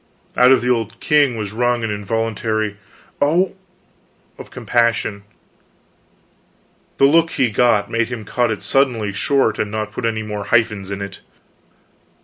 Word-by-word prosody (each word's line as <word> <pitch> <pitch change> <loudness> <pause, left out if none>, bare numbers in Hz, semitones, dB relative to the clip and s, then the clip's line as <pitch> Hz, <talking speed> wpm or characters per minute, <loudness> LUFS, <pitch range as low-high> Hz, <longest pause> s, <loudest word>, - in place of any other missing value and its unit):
Out 125 +1 +6
of 135 - +5
the 125 - -1
old 115 -3 -2
king 145 -5 +2
was 105 -2 -4
wrung 120 +1 0
an 110 - -1
involuntary 110 0 -2 0.5
"O 170 +6 +3
h!" - - -21 0.9
of - - -10
compassion. 115 -3 0 1.8
The 135 - +5
look 165 +3 +4
he 125 -4 +1
got, 110 -1 +2
made 115 0 0
him 115 -4 -6
cut 120 +3 0
it 110 -3 -4
suddenly 125 -7 +1
short 135 +7 +1
and 105 - -1
not 110 0 -4
put 115 - -5
any 110 -1 -1
more 105 -1 -5
hyphens 110 -5 +1
in 100 0 -4
it. 100 -2 -8
115 Hz, 150 wpm, -19 LUFS, 105-125 Hz, 1.8 s, Out